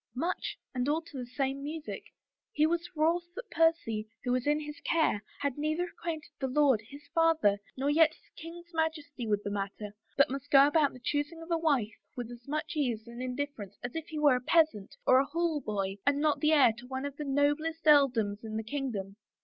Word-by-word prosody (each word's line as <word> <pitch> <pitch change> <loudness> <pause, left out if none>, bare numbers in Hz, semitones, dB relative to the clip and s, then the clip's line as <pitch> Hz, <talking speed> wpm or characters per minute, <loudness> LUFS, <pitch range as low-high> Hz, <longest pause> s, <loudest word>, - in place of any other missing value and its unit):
" 220 - -47
Much 335 +8 -2
— - - -60
and 250 +1 0
all 305 +2 +2
to 320 - -14
the 250 -2 -5
same 270 +2 -2
music. 305 +2 -6 0.5
He 310 -9 +3
was 340 +1 0
wroth 340 +3 +1
that 465 -1 -8
Percy, 275 -11 +1
who 245 - -1
was 250 +2 0
in 295 +1 +3
his 295 -1 -8
care, 315 -10 +1 0.2
had 280 -1 -1
neither 310 +3 0
acquainted 330 -3 -5
the 265 - -1
lord, 265 -4 +3
his 280 +6 -13
father, 325 -12 +3 0.2
nor 270 +2 -1
yet 310 +2 +6
the 310 - -18
king's 340 +2 -10
Majesty 305 -6 -2
with 205 -1 +1
the 205 - -3
matter 205 +1 -4 0.2
but 280 -2 +5
must 275 +1 -5
go 275 0 +8
about 295 -1 +3
the 255 - -11
choosing 290 +5 -2
of 335 - -10
a 335 - +3
wife 275 -10 +1 0.2
with 245 -1 -5
as 240 +1 -12
much 305 +3 -3
ease 240 -7 -1
and 235 +1 -9
indifference 255 -5 -4
as 245 +3 -5
if 325 0 -4
he 315 - -6
were 290 -4 +5
a - - -5
peasant 310 - +2
or 255 - +6
a 275 - +2
hall 325 0 -1
boy 195 -3 -3
and 285 0 +2
not 300 0 +2
the 305 0 +3
heir 275 -7 +6
to 245 - -12
one 265 +1 -4
of 285 0 -6
the 300 - -4
noblest 290 +4 0
earldoms 240 -9 +4
in 220 -1 -4
the 220 - -2
kingdom. 220 -6 -4
285 Hz, 220 wpm, -30 LUFS, 245-315 Hz, 0.5 s, go